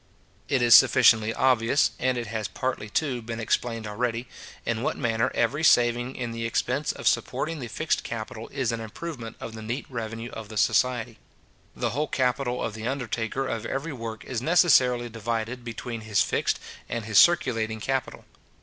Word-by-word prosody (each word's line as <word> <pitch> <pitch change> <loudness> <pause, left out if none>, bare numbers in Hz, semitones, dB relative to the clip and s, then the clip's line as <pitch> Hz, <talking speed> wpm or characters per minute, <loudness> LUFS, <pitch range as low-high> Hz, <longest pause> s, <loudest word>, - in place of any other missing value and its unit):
It 130 -3 +2
is 120 -3 +8
sufficiently 110 +4 +6
obvious, 130 +2 +3
and 130 -1 +1
it 120 - -3
has 110 -1 -3
partly, 130 -5 -3
too, 130 0 -1
been 115 0 -6
explained 115 0 -1
already, 115 +3 -2 0.4
in 115 -1 -1
what - - -1
manner 115 -2 +1
every 140 +6 +1
saving 120 -2 +3
in 120 -2 -4
the 115 0 -4
expense 125 +5 0
of - - -4
supporting 165 0 0
the 125 - -5
fixed 155 +7 -1
capital 115 0 -6
is 130 -4 -1
an 115 - -3
improvement 115 +1 -7
of 115 - -7
the 110 - -8
neat 120 +6 -4
revenue 115 0 -5
of 110 -2 -8
the 110 - -7
society. 115 +1 +1 0.6
The 120 -2 -1
whole 150 +6 -1
capital 125 -1 0
of 110 - -3
the 110 +2 -5
undertaker 125 -1 -2
of 115 -4 -3
every 145 +4 -3
work 115 -3 -7
is 125 -3 -3
necessarily 130 -7 +4
divided 115 +2 -3
between 115 0 -6
his 110 -3 +2
fixed - - 0 0.3
and 115 -2 -3
his 105 -2 +5
circulating 115 -10 +3
capital. 135 +3 -3
120 Hz, 175 wpm, -26 LUFS, 110-130 Hz, 0.6 s, is